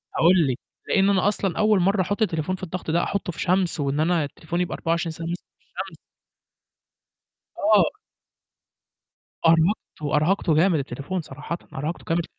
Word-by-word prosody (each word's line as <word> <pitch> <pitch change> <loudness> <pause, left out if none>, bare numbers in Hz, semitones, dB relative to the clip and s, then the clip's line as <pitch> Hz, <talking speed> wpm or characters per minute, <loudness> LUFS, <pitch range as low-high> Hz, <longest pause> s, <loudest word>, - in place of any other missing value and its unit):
هاقول 170 -2 +5
لِك، 130 0 -1 0.3
لإن 195 0 +3
أنا 195 0 +3
أصلًا 195 -3 0
أول 215 -2 +4
مرّة 195 +2 +3
أحُط 205 +5 -2
التليفون 180 -2 0
في 185 - -12
الضغط 180 -2 -4
ده، 170 - +2
أحُطّه 200 -3 -2
في - - -12
شمس 180 -2 +1
وإن 140 +1 0
أنا 165 0 +2
التليفون 165 +4 -4
يبقى 180 - -2
24 165 0 -1
ساعة 165 +1 -6
ماسكه 175 +1 -4 0.2
في - - -36
الشمس. - - -7 1.6
آه. 210 0 +4 1.5
أرهقته، 165 -3 +2
أرهقته 160 +1 +2
جامد 165 -1 +4
التليفون 140 +7 -4
صراحةً، 150 +4 -6 0.2
أرهقته 150 +5 -4
جامد 170 0 +1
170 Hz, 155 wpm, -24 LUFS, 160-190 Hz, 1.6 s, هاقول